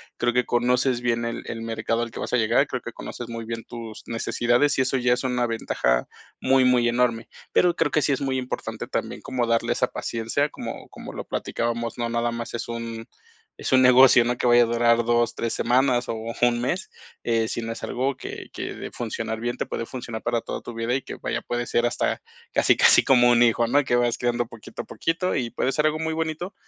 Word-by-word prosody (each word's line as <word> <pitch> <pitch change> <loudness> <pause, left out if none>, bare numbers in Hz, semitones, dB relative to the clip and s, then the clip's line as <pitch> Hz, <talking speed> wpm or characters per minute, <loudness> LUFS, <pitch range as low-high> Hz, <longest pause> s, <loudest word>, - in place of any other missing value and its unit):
Creo 120 - +1
que 125 0 +1
conoces 125 +1 +1
bien 120 -1 0
el 115 - -4
el 115 - -5
mercado 115 0 -1
al 120 -1 -3
que - - -8
vas - - -4
a 125 - +3
llegar, 115 0 +3
creo - - -4
que - - -8
conoces 120 - -7
muy 115 -1 -6
bien 115 0 -6
tus 115 -2 -9
necesidades, 120 +4 +1
y 130 - +4
eso 130 - -1
ya 125 -1 +2
es 125 +2 -2
una 125 -1 +1
ventaja - - 0 0.3
muy, 130 0 +4
muy 125 -2 +4
enorme. 120 -1 +1 0.2
Pero 175 -1 +3
creo - - +1
que 150 - +2
sí 145 - +2
es 135 - -2
muy 135 -1 0
importante 130 -1 -4
también - - -3
como 125 -3 -2
darle 115 0 +1
esa 125 - +1
paciencia, 115 +7 -2
como - - -7
como - - -9
lo - - -6
platicábamos, 115 0 -3
no 120 -1 -1
nada 115 0 0
más 115 0 -5
es 120 - -4
un 115 -1 -6 0.5
es - - -4
un 130 0 +6
negocio, 125 -1 +7
no 120 +1 0
que - - 0
vaya 120 0 +6
a - - +2
durar 115 0 +2
2, 120 0 +2
3 115 - -2
semanas 125 0 +2
o - - 0 0.3
un 120 -1 +3
mes, 155 +10 -2 0.3
eh, 115 -1 +1
sino 115 0 -3
es 115 - -7
algo 130 +2 -1
que - - -8
que - - -5
de - - -7
funcionar 110 0 -4
bien, 120 +1 -2
te - - -2
puede 115 - -4
funcionar 120 -3 -6
para 120 -1 0
toda - - -5
tu 120 - -8
vida 115 +1 -2
y 135 - 0
que, - - -8
vaya, - - -3
puede 120 0 -3
ser 120 +1 +1
hasta 120 - -1 0.3
casi, - - +4
casi - - +6
como 120 -2 +5
un 120 0 +4
hijo. 120 0 +3
¿no? 140 +5 +4
Que 120 - +1
vas 120 -1 +2
criando 120 0 0
poquito 115 -1 -9
a - - -13
poquito 180 +3 -1
y 120 -3 -2
puede 130 - 0
ser 150 +2 +1
algo 155 0 +1
muy 160 0 -1
bonito, 160 +3 -3
120 Hz, 230 wpm, -24 LUFS, 115-125 Hz, 0.5 s, negocio